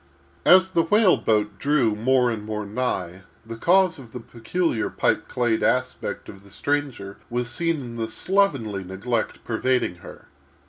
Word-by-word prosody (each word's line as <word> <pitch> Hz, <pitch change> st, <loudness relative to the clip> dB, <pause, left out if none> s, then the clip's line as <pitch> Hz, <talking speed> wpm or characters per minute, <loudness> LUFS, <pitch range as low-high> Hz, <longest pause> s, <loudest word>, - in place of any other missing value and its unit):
As 185 Hz, +1 st, +6 dB
the 170 Hz, -, +3 dB
whale 205 Hz, +3 st, +4 dB
boat 105 Hz, -3 st, 0 dB
drew 140 Hz, -5 st, +2 dB
more 125 Hz, +2 st, +2 dB
and 110 Hz, -2 st, -4 dB
more 105 Hz, 0 st, -4 dB
nigh, 100 Hz, -5 st, -3 dB, 0.2 s
the 115 Hz, 0 st, -7 dB
cause 180 Hz, +6 st, +3 dB
of 120 Hz, -4 st, -13 dB
the 125 Hz, -, -5 dB
peculiar 120 Hz, +3 st, -2 dB
pipe -, -, 0 dB
clayed 120 Hz, -3 st, 0 dB
aspect 125 Hz, 0 st, -1 dB
of 95 Hz, 0 st, -12 dB
the 100 Hz, -, -17 dB
stranger 135 Hz, -7 st, -3 dB
was 120 Hz, 0 st, -2 dB
seen 165 Hz, +4 st, -1 dB
in 120 Hz, -2 st, -8 dB
the 110 Hz, -1 st, -3 dB
slovenly 130 Hz, -, 0 dB
neglect 100 Hz, +5 st, -3 dB
pervading 120 Hz, -4 st, 0 dB
her. -, -, -13 dB
120 Hz, 155 wpm, -24 LUFS, 105-145 Hz, 0.2 s, As